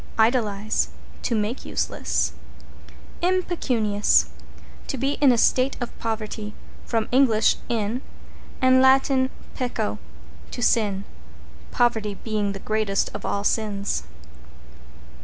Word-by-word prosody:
=IDOLIZE= 220 Hz, -3 st, +2 dB, 0.3 s
To 235 Hz, -, -1 dB
make 215 Hz, +4 st, -2 dB
useless. -, -, -1 dB, 0.9 s
=IMPECUNIOUS= 265 Hz, -, +2 dB, 0.6 s
To 275 Hz, -, -3 dB
be 270 Hz, +3 st, 0 dB
in 280 Hz, -3 st, +7 dB
a 240 Hz, -, +3 dB
state 255 Hz, +4 st, +3 dB
of 245 Hz, -, -5 dB
poverty. 215 Hz, -1 st, -4 dB, 0.3 s
From 225 Hz, -2 st, 0 dB
Eng. 265 Hz, -1 st, +5 dB, 0.4 s
in, 230 Hz, +1 st, -1 dB, 0.6 s
and 260 Hz, 0 st, +5 dB
Lat. 265 Hz, +1 st, +5 dB, 0.4 s
pecco, 240 Hz, -, -2 dB, 0.5 s
to -, -, -6 dB
sin, 205 Hz, -5 st, +2 dB, 0.7 s
poverty 220 Hz, -4 st, +1 dB
being 210 Hz, -1 st, -2 dB
the -, -, -6 dB
greatest 215 Hz, -1 st, 0 dB
of 205 Hz, -, -5 dB
all 200 Hz, -, -1 dB
sins. 205 Hz, -2 st, 0 dB
225 Hz, 105 wpm, -24 LUFS, 210-255 Hz, 0.9 s, in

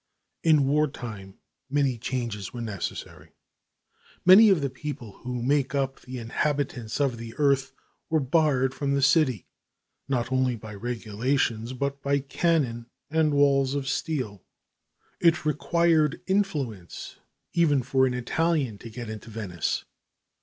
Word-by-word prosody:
In 155 Hz, -4 st, +4 dB
war 150 Hz, +2 st, +3 dB
time 105 Hz, -8 st, -8 dB, 0.3 s
many 140 Hz, -2 st, +1 dB
changes 120 Hz, -5 st, -3 dB
were 120 Hz, -, -6 dB
necessary. 105 Hz, -5 st, -6 dB, 0.9 s
Many 200 Hz, +5 st, +9 dB
of 185 Hz, -6 st, +4 dB
the 140 Hz, -, 0 dB
people 125 Hz, -6 st, -7 dB
who 125 Hz, -1 st, -4 dB
make 140 Hz, +1 st, +1 dB
up 135 Hz, -1 st, -1 dB
the 130 Hz, 0 st, -8 dB
inhabitants 125 Hz, 0 st, -2 dB
of 135 Hz, -5 st, +1 dB
the 115 Hz, -1 st, -8 dB
earth 140 Hz, -3 st, +2 dB, 0.4 s
were 160 Hz, -1 st, +3 dB
barred 135 Hz, -2 st, +2 dB
from 140 Hz, 0 st, -1 dB
the 140 Hz, -, +1 dB
city, 135 Hz, -, +3 dB, 0.6 s
not 125 Hz, -3 st, -1 dB
only 130 Hz, -1 st, +2 dB
by 110 Hz, -1 st, -9 dB
regulations, 115 Hz, +2 st, -1 dB
but 140 Hz, +2 st, -3 dB
by 140 Hz, 0 st, +1 dB
cannon 135 Hz, -4 st, 0 dB, 0.2 s
and 155 Hz, -2 st, +2 dB
walls 140 Hz, -1 st, +3 dB
of 140 Hz, -2 st, -2 dB
steel. 130 Hz, -, -2 dB, 0.8 s
It 170 Hz, -1 st, +3 dB
required 155 Hz, 0 st, +2 dB
influence 150 Hz, -, -2 dB, 0.4 s
even 150 Hz, -6 st, +3 dB
for 130 Hz, +1 st, +3 dB
an 125 Hz, -, -2 dB
Italian 135 Hz, -3 st, 0 dB
to 115 Hz, -, -9 dB
get 120 Hz, +1 st, -7 dB
into 110 Hz, +1 st, -8 dB
Venice. 100 Hz, -7 st, -3 dB
135 Hz, 135 wpm, -26 LUFS, 120-145 Hz, 0.9 s, Many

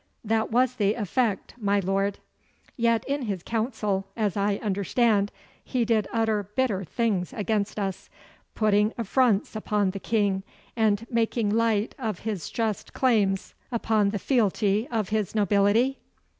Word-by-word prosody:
'That 220 Hz, 0 st, 0 dB
was 250 Hz, +2 st, +2 dB
the 205 Hz, 0 st, +2 dB
effect, 215 Hz, -1 st, -1 dB
my 200 Hz, -2 st, +2 dB
lord.' 195 Hz, +1 st, 0 dB, 0.6 s
'Yet 230 Hz, -2 st, +1 dB
in 280 Hz, +1 st, -1 dB
his 200 Hz, -7 st, -3 dB
council, 220 Hz, -4 st, -1 dB
as 210 Hz, -4 st, 0 dB
I 200 Hz, 0 st, +1 dB
understand, 205 Hz, +1 st, +1 dB, 0.3 s
he 245 Hz, -2 st, 0 dB
did 220 Hz, -3 st, +1 dB
utter 220 Hz, -3 st, 0 dB
bitter 230 Hz, -8 st, +1 dB
things 205 Hz, -1 st, -1 dB
against 215 Hz, -3 st, -1 dB
us, 195 Hz, -3 st, -3 dB, 0.5 s
putting 210 Hz, 0 st, +3 dB
affronts 230 Hz, -2 st, +1 dB
upon 210 Hz, -2 st, 0 dB
the 195 Hz, -, -6 dB
King, 200 Hz, -3 st, +1 dB, 0.3 s
and 220 Hz, -1 st, +2 dB
making 230 Hz, -2 st, +1 dB
light 225 Hz, -1 st, +1 dB
of 220 Hz, -7 st, -3 dB
his 205 Hz, -6 st, -4 dB
just 220 Hz, -3 st, -2 dB
claims 205 Hz, -7 st, +1 dB, 0.2 s
upon 220 Hz, -3 st, +2 dB
the 205 Hz, -, -2 dB
fealty 210 Hz, 0 st, +1 dB
of 220 Hz, -5 st, -1 dB
his 215 Hz, -1 st, -1 dB
nobility? 210 Hz, +5 st, +3 dB
215 Hz, 140 wpm, -26 LUFS, 200-230 Hz, 0.6 s, putting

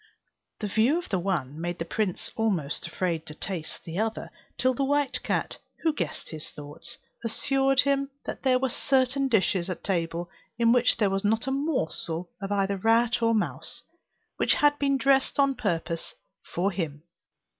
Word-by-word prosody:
The 210 Hz, -, -1 dB
view 225 Hz, -, +3 dB
of 350 Hz, -, -5 dB
the 190 Hz, -, +1 dB
one 160 Hz, -6 st, -2 dB
made 175 Hz, +1 st, -2 dB
the 165 Hz, -, -3 dB
prince 195 Hz, +1 st, -2 dB
almost 185 Hz, -11 st, 0 dB
afraid 170 Hz, -4 st, -1 dB
to 150 Hz, -, -8 dB
taste 175 Hz, -2 st, -6 dB
the 170 Hz, +3 st, -4 dB
other 220 Hz, 0 st, -2 dB, 0.3 s
till 255 Hz, 0 st, +3 dB
the 275 Hz, -, -1 dB
white 285 Hz, 0 st, +1 dB
cat, -, -, -1 dB, 0.2 s
who 320 Hz, -2 st, +3 dB
guessed -, -, -4 dB
his 155 Hz, -1 st, -7 dB
thoughts, 145 Hz, 0 st, -9 dB, 0.3 s
assured 270 Hz, +3 st, +3 dB
him 275 Hz, 0 st, +1 dB, 0.2 s
that -, -, -5 dB
there 260 Hz, -1 st, +4 dB
were 265 Hz, +1 st, 0 dB
certain 270 Hz, +2 st, +2 dB
dishes 190 Hz, -6 st, +2 dB
at 185 Hz, -, -5 dB
table 170 Hz, -2 st, -1 dB, 0.3 s
in 230 Hz, -1 st, +4 dB
which 245 Hz, 0 st, +4 dB
there 205 Hz, -3 st, +2 dB
was 195 Hz, 0 st, 0 dB
not 220 Hz, +3 st, +2 dB
a 265 Hz, -, -1 dB
morsel 180 Hz, -, -1 dB
of 195 Hz, 0 st, -4 dB
either 200 Hz, -1 st, +1 dB
rat 225 Hz, +3 st, +3 dB
or 230 Hz, 0 st, +3 dB
mouse, 215 Hz, -, -3 dB, 0.5 s
which -, -, +3 dB
had 290 Hz, 0 st, +3 dB
been 275 Hz, -1 st, +2 dB
dressed 270 Hz, +1 st, +3 dB
on 275 Hz, -1 st, +5 dB
purpose 170 Hz, -7 st, -2 dB, 0.4 s
for 190 Hz, +4 st, +1 dB
him. 160 Hz, -5 st, -4 dB
220 Hz, 175 wpm, -27 LUFS, 175-265 Hz, 0.5 s, on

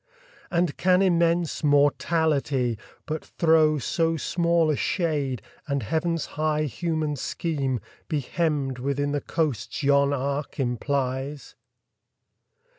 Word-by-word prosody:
And 170 Hz, -3 st, 0 dB
can 185 Hz, +1 st, +4 dB
immense 170 Hz, -3 st, +2 dB
Mortality 145 Hz, -3 st, +2 dB, 0.3 s
but 155 Hz, -1 st, -4 dB
throw 160 Hz, -2 st, +3 dB
So 165 Hz, +4 st, 0 dB
small 170 Hz, 0 st, +2 dB
a -, -, +1 dB
shade, 145 Hz, -, -1 dB, 0.2 s
and 140 Hz, -3 st, -1 dB
Heaven's 165 Hz, +7 st, -1 dB
high 155 Hz, 0 st, -1 dB
human 155 Hz, +2 st, -2 dB
scheme 140 Hz, -3 st, -2 dB, 0.3 s
Be 155 Hz, -, 0 dB
hemmed 140 Hz, -3 st, -1 dB
within 140 Hz, +2 st, -1 dB
the 145 Hz, 0 st, -1 dB
coasts 125 Hz, -10 st, -2 dB
yon 140 Hz, 0 st, +4 dB
arc 140 Hz, +2 st, -2 dB
implies? 135 Hz, +2 st, -2 dB
150 Hz, 110 wpm, -25 LUFS, 140-165 Hz, 0.3 s, can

